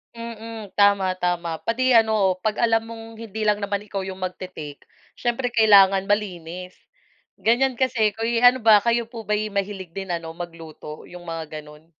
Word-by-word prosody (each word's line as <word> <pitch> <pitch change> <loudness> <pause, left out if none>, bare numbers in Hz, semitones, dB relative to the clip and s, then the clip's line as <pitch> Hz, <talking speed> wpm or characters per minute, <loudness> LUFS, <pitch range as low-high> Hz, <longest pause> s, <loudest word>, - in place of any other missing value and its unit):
Mm, 225 -2 -8
tama, 200 -2 +3
tama, 175 -2 -1
pati 255 +3 +1
ano, 220 -5 +4
'pag 215 - 0
alam 225 -1 +2
mong 225 0 -10
hindi 220 -1 -7
lang 210 -1 +2
naman 200 0 -2
ikaw 200 -2 -5
'yong 190 0 -7
magte-take, 180 -5 -7 0.3
siyempre 245 +1 -1
kailangan 200 -4 +5
malinis, 180 -3 -3 0.6
ganiyan 250 +4 +3
kasi 230 -5 +1
'ko 225 - -10
eh, 230 0 +1
ano 250 +1 +6
ba 220 -1 +7
kayo 235 -1 0
po 230 -2 -8
ba 210 - 0 0.2
mahilig 200 -2 -3
din 195 -1 -4
ano 165 -1 -4
magluto 165 -3 -9
'yong 175 0 -11
mga 165 -1 -5 0.2
gano'n? 150 +2 -16
205 Hz, 165 wpm, -23 LUFS, 180-225 Hz, 0.6 s, ba